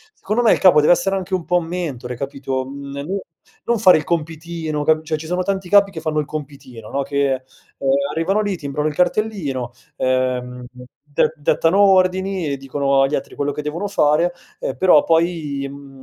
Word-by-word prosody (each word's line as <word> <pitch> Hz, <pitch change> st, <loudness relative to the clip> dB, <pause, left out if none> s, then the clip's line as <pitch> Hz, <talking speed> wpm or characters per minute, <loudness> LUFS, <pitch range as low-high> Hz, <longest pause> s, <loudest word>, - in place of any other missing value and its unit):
secondo 215 Hz, +4 st, -1 dB
me, 225 Hz, -, +5 dB
il -, -, 0 dB
capo 185 Hz, -5 st, +6 dB
deve 150 Hz, -, +6 dB
essere 195 Hz, +3 st, 0 dB
anche 190 Hz, 0 st, -6 dB
un 170 Hz, -, -4 dB
pò 180 Hz, 0 st, +2 dB
mentore, 160 Hz, -8 st, -5 dB
capito, 135 Hz, 0 st, -4 dB
mhmm, 140 Hz, +1 st, -8 dB
no 195 Hz, +5 st, -2 dB, 0.4 s
non 235 Hz, -1 st, 0 dB
fare 185 Hz, -5 st, +7 dB
il 155 Hz, -, -3 dB
compitino 160 Hz, -1 st, -3 dB
cap 155 Hz, +1 st, +3 dB
cioè 155 Hz, 0 st, -2 dB
ci 155 Hz, -, -9 dB
sono 180 Hz, +3 st, -1 dB
tanti 190 Hz, -1 st, -2 dB
capi 200 Hz, 0 st, +5 dB
che 165 Hz, -, -6 dB
fanno 155 Hz, -1 st, -1 dB
il 150 Hz, -, -1 dB
compitino, 135 Hz, -7 st, -8 dB
no, 140 Hz, -, -1 dB
che, 140 Hz, 0 st, 0 dB
ehm, 130 Hz, 0 st, -5 dB, 0.7 s
arrivano 190 Hz, +6 st, 0 dB
lì 205 Hz, -2 st, -1 dB
timbrano 150 Hz, -1 st, -3 dB
il 155 Hz, -, -2 dB
cartellino, 175 Hz, -, -1 dB, 0.3 s
ehm, 125 Hz, -1 st, -1 dB, 0.4 s
de 145 Hz, +1 st, 0 dB
dettano 165 Hz, +5 st, +2 dB
ordini 190 Hz, -2 st, +3 dB
e 140 Hz, -, -2 dB
dicono 135 Hz, 0 st, 0 dB
agli 135 Hz, +2 st, +2 dB
altri -, -, -5 dB
quello 145 Hz, 0 st, -1 dB
che 150 Hz, -, -5 dB
devono 170 Hz, +7 st, -3 dB
fare, 170 Hz, -2 st, +2 dB, 0.3 s
ehm, -, -, -3 dB
però 180 Hz, -5 st, +5 dB
poi, 160 Hz, -4 st, 0 dB
mhmm, 140 Hz, -1 st, -12 dB
155 Hz, 190 wpm, -20 LUFS, 140-180 Hz, 0.7 s, fare